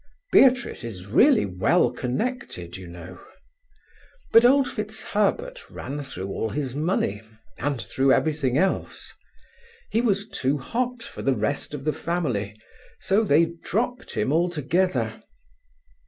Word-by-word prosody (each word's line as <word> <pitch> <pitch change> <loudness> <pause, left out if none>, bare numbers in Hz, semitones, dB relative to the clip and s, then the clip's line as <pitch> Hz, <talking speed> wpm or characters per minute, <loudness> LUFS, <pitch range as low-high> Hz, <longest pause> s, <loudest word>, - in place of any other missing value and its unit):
Beatrice 250 - +4
is 100 -6 -7
really 235 - +4
well 90 -1 +2
connected, 130 - -4
you 95 -1 -9
know. 85 +1 -10 1.1
But 230 +1 +7
old 270 +1 +5
FitzHerbert 220 - -2
ran 145 +2 -6
through 95 -9 -6
all 110 +3 -2
his 135 0 -3
money, 145 - -1 0.4
and 140 -3 -1
through 135 +3 +1
everything 140 -4 +1
else. 190 +4 -1 0.8
He 225 - +2
was 200 -3 +1
too 140 -8 -1
hot 245 - -3
for - - -8
the 135 -1 +1
rest 125 +7 -2
of 135 - -7
the 155 +1 0
family, 115 - -2 0.4
so 200 +4 +2
they 165 -2 +3
dropped 245 +5 -2
him 135 - 0
altogether. 175 +2 0
155 Hz, 125 wpm, -25 LUFS, -, 1.1 s, But